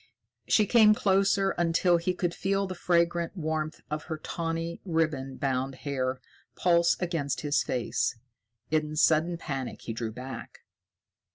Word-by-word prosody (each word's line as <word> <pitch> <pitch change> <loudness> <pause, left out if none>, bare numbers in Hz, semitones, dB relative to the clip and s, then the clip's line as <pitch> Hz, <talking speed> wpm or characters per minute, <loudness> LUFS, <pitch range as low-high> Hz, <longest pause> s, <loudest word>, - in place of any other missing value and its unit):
She 215 - +4
came 215 -1 +6
closer 195 -1 +2
until 175 +1 +3
he 180 +2 -1
could 175 -1 -1
feel 195 +2 0
the 185 - -4
fragrant 170 0 +1
warmth 155 -1 -2
of 155 0 -3
her 160 - -4
tawny, 165 +1 -4
ribbon 155 -7 -1
bound 135 -1 -1
hair 130 -2 -1 0.4
pulse 170 -1 +3
against 165 -6 -2
his 145 -1 +1
face. 120 -1 -1 0.6
In 155 -1 0
sudden 160 +2 +3
panic 135 -6 -5
he 115 - -4
drew 115 -1 -3
back. 130 +4 -8
165 Hz, 140 wpm, -28 LUFS, 140-175 Hz, 0.6 s, came